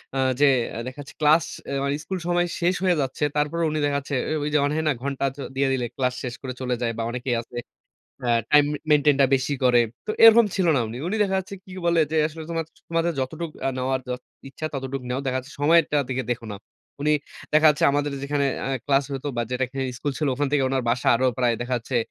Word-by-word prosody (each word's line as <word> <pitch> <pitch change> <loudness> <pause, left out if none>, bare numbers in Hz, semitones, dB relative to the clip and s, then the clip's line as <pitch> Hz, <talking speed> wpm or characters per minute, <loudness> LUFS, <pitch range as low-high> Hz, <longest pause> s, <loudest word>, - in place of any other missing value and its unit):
আ - - -1 0.2
যে 145 - +6 0.3
অ্যা - - -6
দেখা 130 +2 -8
যাচ্ছে 140 - -12
ক্লাস, 155 +2 +5 0.2
এ - - -4
মানে 140 +1 0
স্কুল 190 -1 -4
সময় 175 0 +2
শেষ 180 +1 +2
হয়ে 180 -2 +3
যাচ্ছে। 135 +1 -3
তারপরও 150 +3 0
উনি 155 - -1
দেখা 145 -1 +1
যাচ্ছে 140 0 -4 0.2
এ - - +1
ওই 150 - -1
যে - - +5
অন 145 - 0
হ্যাঁ, 160 0 -1
না 150 - +3
ঘন্টা 140 0 -1
তো 140 - -8
দিয়ে 135 +1 +2
দিলে 125 -2 -1
ক্লাস 125 -2 0
শেষ 125 -2 -4
করে 130 -2 -5
চলে 125 -1 0
যায় 120 -1 0
বা 115 - -2
অনেকেই 125 +1 -2
আছে 120 +1 -11 0.7
আ - - 0 0.2
টাইম 150 -1 +7
মে 150 - -3
মেইনটেইনটা 145 -2 +5
বেশি 135 +2 0
করে। 125 -1 +5 0.3
তো - - -2
এরকম 225 0 +9
ছিল 190 -3 +1
না - - +3
উনি। 115 - -7
উনি 185 - -1
দেখা 195 -2 0
যাচ্ছে 190 +1 -6
কি 185 - -12
বলে 170 -1 +4
যে 160 - -1
আসলে 160 +1 -8
তোমা 165 -1 -1 0.3
তোমাদের 165 +1 +1
যতটুক 160 +5 -4 0.2
আ - - +2
নেওয়ার, 130 +1 -1
যত 125 0 -4 0.3
ইচ্ছা 135 +3 -5
ততটুক 135 0 -4
নেও। 125 +1 -1
দেখা 130 -1 0
যাচ্ছে 135 +3 -14
সময়টার 150 -1 +4
দিকে 130 0 -2
দেখো 115 -1 -7
না। - - -6 0.5
উনি 150 - +3 0.4
দেখা 155 +1 +6
যাচ্ছে 150 - 0
আমাদের 145 0 0
যেখানে 140 0 0 0.2
আ - - -1 0.2
ক্লাস 140 -1 +3
হতো 135 +2 -4
বা 120 - +1
যেটাকে 130 +1 -2 0.2
স্কুল 145 +3 -2
ছিল 150 - 0
ওখান 145 +2 0
থেকে 145 -2 +3
ওনার 130 0 0
বাসা 120 +1 +1
আরো 130 +3 +2
প্রায় 120 -2 +2
দেখা 125 +1 -1
যাচ্ছে 120 +2 -3
140 Hz, 240 wpm, -24 LUFS, 130-155 Hz, 0.7 s, এরকম